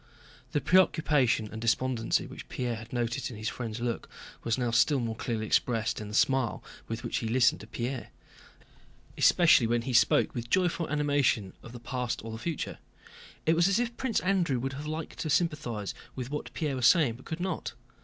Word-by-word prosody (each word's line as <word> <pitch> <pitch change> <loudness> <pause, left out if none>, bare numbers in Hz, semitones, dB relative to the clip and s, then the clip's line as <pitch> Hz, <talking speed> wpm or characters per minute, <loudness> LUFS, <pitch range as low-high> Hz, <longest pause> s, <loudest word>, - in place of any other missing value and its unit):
The 145 - 0
preoccupation 150 -11 +3
and 110 - -7
despondency 115 0 +1
which - - -10
Pierre 120 -2 -2
had 110 +1 -10
noticed 120 -1 -2
in 120 - -8
his 110 +1 -2
friend's 115 -2 -5
look 120 -1 -3 0.3
was 115 +1 0
now 120 -2 0
still 135 +4 +4
more 115 -2 -2
clearly 110 -1 -3
expressed 115 0 +1
in 105 - -6
the 105 - -6
smile 130 -1 +2 0.2
with 115 +1 -5
which - - -2
he 115 - -2
listened 115 -4 +3
to 110 - -11
Pierre, 125 +3 -4 1.1
especially 160 -9 +5
when 120 0 +1
he 130 +1 -3
spoke 120 - +4
with 120 -1 -5
joyful 175 -1 +1
animation 145 -9 +1
of 120 - -11
the 120 - -9
past 120 -1 -3
or 115 - -5
the 110 - -6
future. 165 +3 -4 0.7
It 160 - +4
was 170 +2 +4
as 195 - +2
if 240 -1 -1
Prince 245 -4 0
Andrew 180 -8 +1
would 135 +2 -3
have 145 +2 -6
liked 155 +1 -5
to 155 - -2
sympathize 140 - 0 0.2
with 125 0 -5
what 150 - -4
Pierre 150 -5 -1
was 125 -1 +4
saying, 145 -10 +4
but 130 - -16
could 160 - -5
not. 180 -2 -3
125 Hz, 195 wpm, -29 LUFS, 115-150 Hz, 1.1 s, especially